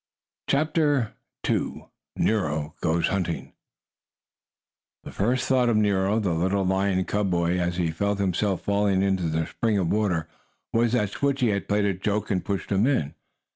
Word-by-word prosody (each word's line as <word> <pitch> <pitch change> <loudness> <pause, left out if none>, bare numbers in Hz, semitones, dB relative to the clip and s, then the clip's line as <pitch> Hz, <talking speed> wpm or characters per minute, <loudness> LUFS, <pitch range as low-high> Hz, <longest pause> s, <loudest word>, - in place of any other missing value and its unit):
CHAPTER 145 -4 +1 0.3
II - - -2 0.3
NERO 75 -8 0
GOES 85 0 +1
HUNTING 90 -4 -2 1.5
The - - -8
first 125 +5 0
thought 125 -2 +3
of 115 - +2
Nero, 100 0 +2
the 95 -6 0
little 95 +4 +1
lion 95 0 +1
cub 105 -1 0
boy, 85 0 +1
as 85 0 -1
he 85 -3 0
felt 100 +5 -1
himself 95 0 0
falling 100 -1 +2
into 95 -4 +1
the 80 0 0
spring 110 +5 -1
of 90 -4 0
water, 95 -7 0 0.5
was 115 0 +2
that 105 -5 +2
Switchie 135 -4 +1
had 100 - -3
played 105 0 +2
a 100 - +1
joke 105 +3 -2
and 95 -3 0
pushed 100 -1 -3
him 100 +5 +3
in. 80 - 0
100 Hz, 160 wpm, -25 LUFS, 90-105 Hz, 1.5 s, thought